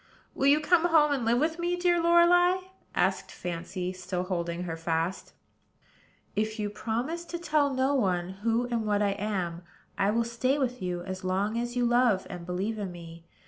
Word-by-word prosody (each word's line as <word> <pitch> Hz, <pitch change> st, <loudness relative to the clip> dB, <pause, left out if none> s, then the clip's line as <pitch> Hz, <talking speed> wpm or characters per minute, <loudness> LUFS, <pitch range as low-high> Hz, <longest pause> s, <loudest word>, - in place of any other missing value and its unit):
"Will 275 Hz, -, +1 dB
you 290 Hz, +2 st, +6 dB
come 335 Hz, +2 st, +3 dB
home 315 Hz, -3 st, +4 dB
and 270 Hz, -5 st, 0 dB
live 235 Hz, +1 st, +3 dB
with 320 Hz, +5 st, 0 dB
me, 350 Hz, +1 st, 0 dB
dear 350 Hz, -1 st, +2 dB
Lorelei?" 345 Hz, +2 st, +5 dB, 0.4 s
asked -, -, +1 dB
Fancy, 180 Hz, +1 st, -5 dB
still 180 Hz, 0 st, -3 dB
holding 175 Hz, -2 st, -3 dB
her 165 Hz, -2 st, -4 dB
fast. 165 Hz, +2 st, -2 dB, 1.0 s
"If 215 Hz, +1 st, -1 dB
you 210 Hz, -1 st, -2 dB
will 205 Hz, -, -14 dB
promise 245 Hz, +11 st, -2 dB
to 345 Hz, -, -5 dB
tell 305 Hz, -4 st, +1 dB
no 265 Hz, +1 st, +1 dB
one 185 Hz, -9 st, +1 dB
who 230 Hz, +2 st, +1 dB
and 235 Hz, -2 st, -1 dB
what 205 Hz, 0 st, +2 dB
I 200 Hz, -, +2 dB
am, 190 Hz, -4 st, -3 dB, 0.4 s
I 195 Hz, -, +3 dB
will 230 Hz, +2 st, +2 dB
stay 255 Hz, +4 st, 0 dB
with 250 Hz, -4 st, -2 dB
you 180 Hz, -1 st, -3 dB
as 185 Hz, 0 st, -6 dB
long 195 Hz, +4 st, 0 dB
as 240 Hz, +1 st, -3 dB
you 245 Hz, -1 st, +2 dB
love 240 Hz, -5 st, +3 dB
and 175 Hz, -1 st, -8 dB
believe 195 Hz, +5 st, -2 dB
in 195 Hz, -3 st, -4 dB
me. 170 Hz, -1 st, -11 dB
220 Hz, 190 wpm, -28 LUFS, 185-280 Hz, 1.0 s, you